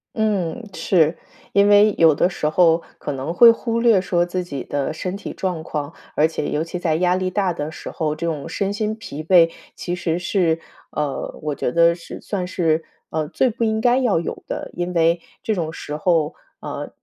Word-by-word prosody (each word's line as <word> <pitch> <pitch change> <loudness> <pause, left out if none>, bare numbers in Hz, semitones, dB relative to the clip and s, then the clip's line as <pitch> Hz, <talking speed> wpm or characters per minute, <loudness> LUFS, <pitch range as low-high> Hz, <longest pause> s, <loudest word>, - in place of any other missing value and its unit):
嗯， 215 0 -1
是， 165 -4 +2 0.4
因 200 0 +5
为 205 0 +6
有 160 -3 +6
的 175 - +2
时 150 - -1
候 165 0 +4 0.2
可 145 - -4
能 135 +4 -3
会 235 +4 +9
忽 230 0 -2
略 230 -5 +4
说 175 -1 +1
自 180 +1 -3
己 140 -6 -5
的 145 +1 -2
身 180 +4 -4
体 200 - -7
状 180 -4 -3
况， 150 0 -4 0.2
而 155 - +4
且 160 - -3
尤 150 - 0
其 165 +2 -5
在 165 -3 +1
压 180 +1 +2
力 185 0 -1
大 185 -1 0
的 155 -1 -4
时 - - -8
候， 155 -2 -2
这 165 +2 -4
种 165 -1 -3
身 200 +3 -1
心 215 +1 -1
疲 155 -8 -7
惫 165 -1 +5 0.2
其 175 - -4
实 170 -2 -1
是， 175 -3 +1 0.3
呃， 150 -2 -3
我 150 - -1
觉 125 - -2
得 170 +2 +5
是 170 - -9
算 185 -3 -3
是， 165 -3 +1 0.3
呃， 155 -1 -1
最 250 - +1
不 230 +2 -3
应 220 -1 +1
该 245 +3 +3
要 230 -10 +2
有 170 - -5
的。 - - -5
因 175 +1 -3
为 170 0 +3 0.2
这 220 - 0
种 165 -5 -2
时 150 -2 -6
候， 160 -1 +1 0.3
啊， - - -6
175 Hz, 220 characters per minute, -21 LUFS, 160-195 Hz, 0.4 s, 会